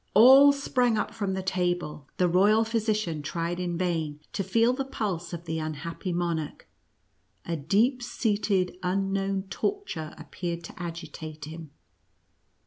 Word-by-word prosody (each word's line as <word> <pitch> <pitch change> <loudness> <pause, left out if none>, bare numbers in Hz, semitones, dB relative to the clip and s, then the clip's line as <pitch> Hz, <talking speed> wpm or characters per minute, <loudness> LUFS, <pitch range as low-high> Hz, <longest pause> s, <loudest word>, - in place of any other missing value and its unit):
All 265 +6 +9
sprang 250 -4 +1
up - - -2
from 200 -4 -2
tbe 190 -1 -4
table, 175 -6 -1
the 180 - +3
royal 205 +6 +4
physi 225 -1 0
cian 170 -8 -2
tried 170 +4 -3
in 175 -1 -2
vain 165 -5 -1
to 195 - -1
feel 230 +6 +3
the 270 +1 -2
pulse 200 -10 -3
of 170 -1 -6
the 160 -1 -2
un 155 0 -3
happy 170 +5 -5
monarch, 170 -3 -2 0.8
a 170 - -2
deep 215 - +2
seated, 205 -6 0
unknown 195 +1 0
torture 395 - -3
appeared 170 +2 -5
to 170 - -10
agitate 160 -3 -7
him. 160 0 -8
180 Hz, 145 wpm, -27 LUFS, 165-215 Hz, 0.8 s, All